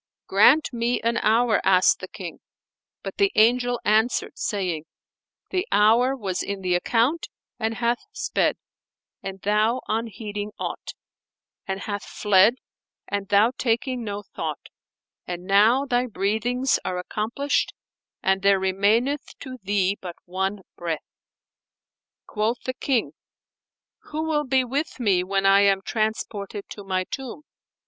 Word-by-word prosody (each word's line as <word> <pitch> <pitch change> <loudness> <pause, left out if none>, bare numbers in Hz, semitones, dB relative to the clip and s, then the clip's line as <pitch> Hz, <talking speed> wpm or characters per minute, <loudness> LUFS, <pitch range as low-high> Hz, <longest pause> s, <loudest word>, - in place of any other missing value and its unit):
"Grant 250 +10 +5
me 235 +1 0
an 235 0 +1
hour," 225 +1 +3
asked 185 -1 +4
the - - -7
King; - - -8 0.6
but - - -6
the 400 -1 +3
Angel 245 +2 +3
answered 220 +3 +2
saying, 180 -7 -2 0.7
"The 370 0 -1
hour 230 +6 +4
was 195 -8 -3
in 200 -1 -4
the 180 -1 0
account 235 - +1 0.3
and 225 0 -1
hath 235 +1 0
sped, - - 0 0.6
and 195 0 -6
thou 215 +4 +2
unheeding 210 -2 -3
aught; - - -5 0.7
and 195 0 -3
hath 205 -1 -4
fled, 210 +3 +4 0.5
and 200 -1 -3
thou 210 +3 +4
taking 245 +1 0
no 205 -1 -4
thought: - - -6 0.6
and 175 0 -5
now 215 +8 +4
thy 250 -1 +1
breathings 235 +5 0
are 180 - -2
accomplished, 220 +10 -1 0.5
and 190 0 +2
there 200 0 +5
remaineth 205 +9 +1
to 255 -2 -8
thee 200 0 0
but 175 -2 -7
one 190 +2 -2
breath." 165 -3 -4 1.2
Quoth 220 +3 -1
the 255 - -2
King, 255 -2 0 0.9
"Who 310 +1 -3
will 305 -2 0
be 260 0 +2
with 270 +4 -3
me 195 -6 +2
when 195 +1 0
I 195 0 +6
am 195 -1 +3
transported 215 -2 -3
to 205 - -8
my 185 -1 -1
tomb?" 265 +7 -7
215 Hz, 135 wpm, -24 LUFS, 195-245 Hz, 1.2 s, I